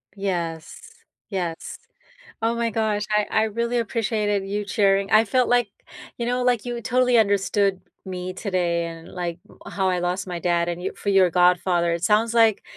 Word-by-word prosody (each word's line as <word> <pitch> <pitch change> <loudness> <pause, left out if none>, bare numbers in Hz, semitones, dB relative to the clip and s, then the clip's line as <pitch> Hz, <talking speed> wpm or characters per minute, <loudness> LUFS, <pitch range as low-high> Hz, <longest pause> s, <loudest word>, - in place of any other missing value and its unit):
Yes, 170 -5 -4 0.5
yes. 175 -5 -4 0.7
Oh 225 +1 +1
my 235 0 -1
gosh, 215 -1 -1
I 210 0 +2
I 220 - +2
really 235 +2 -1
appreciated 210 -3 -1
you 205 +1 -3
sharing 195 -1 +2
I 220 +1 +6
felt 250 +4 +1
like, 245 -3 +2 0.5
you 235 - -2
know, 250 +1 0
like, 245 -3 +1
you 240 -1 -4
totally 250 +1 +2
understood 200 -2 +1 0.2
me 185 -1 -5
today 180 -3 -1
and, 165 0 -9
like, 175 -1 -5 0.3
uh, - - -7
how 190 -1 0
I 180 -1 +1
lost 180 +2 -2
my 175 -2 -4
dad, 170 0 0
and 175 +1 -4
you 190 - -3
for - - -6
your 190 -2 +4
godfather. 180 0 +2
It 170 +1 -2
sounds 220 +4 +2
like, 225 -3 +4
200 Hz, 180 wpm, -23 LUFS, 180-225 Hz, 0.7 s, I